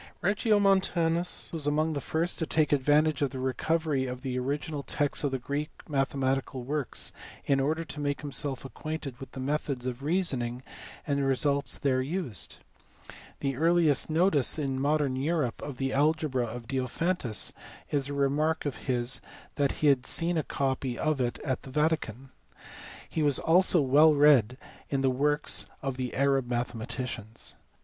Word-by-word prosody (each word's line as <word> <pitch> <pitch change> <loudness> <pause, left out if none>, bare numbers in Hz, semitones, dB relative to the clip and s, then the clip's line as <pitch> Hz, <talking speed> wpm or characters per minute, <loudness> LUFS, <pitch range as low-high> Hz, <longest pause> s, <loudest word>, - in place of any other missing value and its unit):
Regiomontanus 190 -5 +2
was 155 -3 -2
among 155 +2 +1
the 140 - -3
first 165 +5 -1
to 160 - -1
take 155 -2 +2
advantage 150 +2 +3
of 140 - +2
the 130 - -7
recovery 140 +1 0
of 125 +1 -6
the 130 -2 -3
original 145 +3 -2
texts 145 +1 -1
of 145 - +2
the 135 - -2
Greek 140 +4 -3 0.2
mathematical 135 -2 -1
works 145 +1 -1 0.3
in 135 -1 +2
order 155 +4 0
to 150 - -7
make 145 -1 -1
himself 140 -2 -3
acquainted 140 0 -6
with 135 - -10
the 135 - -7
methods 135 -2 -2
of 125 0 -4
reasoning 135 -7 0 0.4
and 140 -2 0
results 140 +1 +1
there 130 -2 +1
used; 135 - -3 0.8
the 135 -1 -1
earliest 160 -1 +3
notice 160 -4 +3
in 135 -3 -1
modern 145 -2 +1
Europe 140 -2 -1
of 140 -3 -6
the 135 0 -1
algebra 145 -3 +1
of 115 +1 -7
Diophantus 130 - -1 0.4
is 140 -2 0
a - - -3
remark 145 +4 +1
of 145 - -2
his 125 0 0 0.3
that 140 -1 +1
he - - +5
had 130 -2 +2
seen 170 +1 0
a 160 - +2
copy 135 -3 -2
of 155 -3 0
it 120 -1 -1
at 130 -4 -1
the - - -11
Vatican. 135 -4 -1 0.8
He 160 - -2
was 145 -3 +3
also 175 0 +5
well 150 +3 +5
read 140 -5 +5 0.3
in 135 -1 0
the 135 -1 +3
works 145 +3 +1 0.2
of 135 -1 -2
the 125 -1 -3
Arab 135 -2 +2
mathematicians. 120 -2 -4
140 Hz, 160 wpm, -29 LUFS, 130-155 Hz, 0.8 s, he